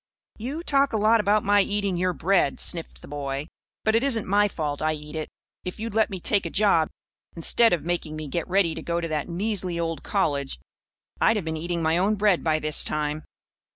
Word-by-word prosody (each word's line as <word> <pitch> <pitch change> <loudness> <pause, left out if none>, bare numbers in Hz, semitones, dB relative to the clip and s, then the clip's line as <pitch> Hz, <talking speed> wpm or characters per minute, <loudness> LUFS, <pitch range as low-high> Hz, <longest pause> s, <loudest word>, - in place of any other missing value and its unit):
"You 275 +9 -4
talk 280 -5 +2
a - - +2
lot 220 +2 +4
about 210 0 +2
my 205 0 +4
eating 200 -1 -1
your 180 +1 +1
bread," 175 -5 +1
sniffed 165 -2 -1
the - - -10
boy. 140 -1 -4 0.4
"But 220 - +2
it 225 - +4
isn't 245 -6 +2
my 205 +2 +3
fault 150 -6 -4
I 155 0 +1
eat 150 0 -8
it. 155 -1 -4 0.3
If 180 +3 -6
you'd 225 0 -4
let 220 0 +2
me 190 - -5
take 200 +3 +1
a - - -4
job, 195 -6 +3 0.5
instead 225 +7 +3
of 160 -4 0
making 170 -3 -2
me 155 -1 -5
get 170 +4 -3
ready 185 -3 +2
to - - -6
go 170 0 -2
to 170 - -3
that 155 +1 -3
measly 185 -1 0
old 165 -1 -2
college, 140 - -1 0.6
I'd 225 - +4
have 205 -6 -2
been 160 0 -2
eating 170 +1 -3
my 160 +2 +2
own 205 +4 +2
bread 205 -3 +2
by 155 -1 +2
this 155 -1 +2
time." 150 0 -2
175 Hz, 220 wpm, -25 LUFS, 155-205 Hz, 0.6 s, lot